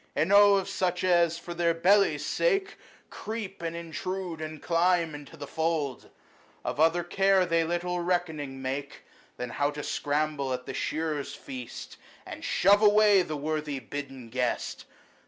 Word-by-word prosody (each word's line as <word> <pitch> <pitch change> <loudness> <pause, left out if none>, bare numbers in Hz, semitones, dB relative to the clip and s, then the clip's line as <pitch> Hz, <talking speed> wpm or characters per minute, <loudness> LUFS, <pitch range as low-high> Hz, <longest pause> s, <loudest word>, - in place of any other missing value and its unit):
Enow 200 +6 +6
of 195 -1 0
such 180 -2 -1
as, 170 -2 +3
for 175 - -7
their 170 -1 +1
bellies' 195 +4 +3
sake, 395 -5 0 0.3
Creep, 215 -4 -6
and 165 0 -3
intrude, 170 +1 -5
and 155 0 -6
climb 170 -1 +2
into 145 -1 -10
the - - -6
fold! 160 -5 -2 0.6
Of - - -3
other 165 +2 +3
care 195 +1 +3
they 165 -1 +2
little 175 +2 -2
reckoning 160 -7 -2
make 135 +2 -4 0.3
Than 125 -1 -5
how 145 0 0
to 145 0 -6
scramble 145 -2 -1
at 125 0 -5
the 135 - -6
shearers' 155 -1 -2
feast, 125 -3 -8 0.3
And - - -8
shove 205 +2 +4
away 210 -2 +6
the 155 -4 -4
worthy 150 -1 -2
bidden 135 -1 -7
guest. 125 -1 -2
165 Hz, 150 wpm, -28 LUFS, 145-185 Hz, 0.6 s, Enow